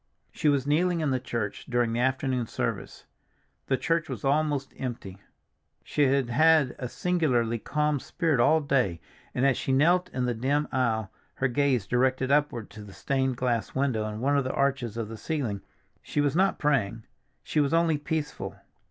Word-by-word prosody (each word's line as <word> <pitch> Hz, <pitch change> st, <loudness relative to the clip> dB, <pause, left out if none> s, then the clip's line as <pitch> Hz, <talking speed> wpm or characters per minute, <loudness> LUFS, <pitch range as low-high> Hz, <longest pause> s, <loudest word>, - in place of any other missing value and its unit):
She 150 Hz, -, +1 dB
was 140 Hz, -2 st, +1 dB
kneeling 170 Hz, +4 st, +2 dB
in 150 Hz, -3 st, 0 dB
the 130 Hz, -, +1 dB
church 115 Hz, -5 st, -4 dB
during 120 Hz, -2 st, +1 dB
the 120 Hz, -, -1 dB
afternoon 130 Hz, -1 st, 0 dB
service; -, -, -4 dB, 0.6 s
the 130 Hz, -, +2 dB
church 165 Hz, +2 st, 0 dB
was -, -, -5 dB
almost 145 Hz, -1 st, 0 dB
empty. 115 Hz, -7 st, -6 dB, 0.6 s
She 145 Hz, -, +1 dB
had 135 Hz, -1 st, +2 dB
had 155 Hz, -1 st, +4 dB
a 125 Hz, -, -4 dB
singularly 125 Hz, -11 st, 0 dB
calm 150 Hz, +3 st, 0 dB
spirit 160 Hz, -1 st, -1 dB
all 155 Hz, +6 st, +4 dB
day, 125 Hz, -, +1 dB, 0.4 s
and 125 Hz, -, +2 dB
as 135 Hz, -2 st, +2 dB
she -, -, -2 dB
knelt 175 Hz, +7 st, +3 dB
in 125 Hz, -7 st, -2 dB
the 125 Hz, -, 0 dB
dim 140 Hz, +6 st, 0 dB
aisle, 110 Hz, -6 st, 0 dB, 0.2 s
her 135 Hz, -, +1 dB
gaze 130 Hz, -4 st, +1 dB
directed 130 Hz, +3 st, +1 dB
upward 145 Hz, -7 st, +1 dB
to 105 Hz, -, -10 dB
the 100 Hz, -1 st, -12 dB
stained 130 Hz, +5 st, -1 dB
glass 120 Hz, -3 st, -1 dB
window 130 Hz, -6 st, 0 dB
in 105 Hz, +1 st, -5 dB
one 140 Hz, +3 st, +2 dB
of 140 Hz, -, +2 dB
the 130 Hz, -, -3 dB
arches 130 Hz, -5 st, 0 dB
of 115 Hz, -2 st, -3 dB
the 110 Hz, +1 st, -8 dB
ceiling, 115 Hz, -6 st, -3 dB, 0.4 s
she -, -, -3 dB
was 145 Hz, 0 st, +1 dB
not 190 Hz, +2 st, +2 dB
praying, 115 Hz, -7 st, 0 dB, 0.4 s
she 155 Hz, -, -1 dB
was 145 Hz, -1 st, +2 dB
only 165 Hz, -2 st, +2 dB
peaceful. 150 Hz, 0 st, -4 dB
135 Hz, 180 wpm, -27 LUFS, 120-150 Hz, 0.6 s, had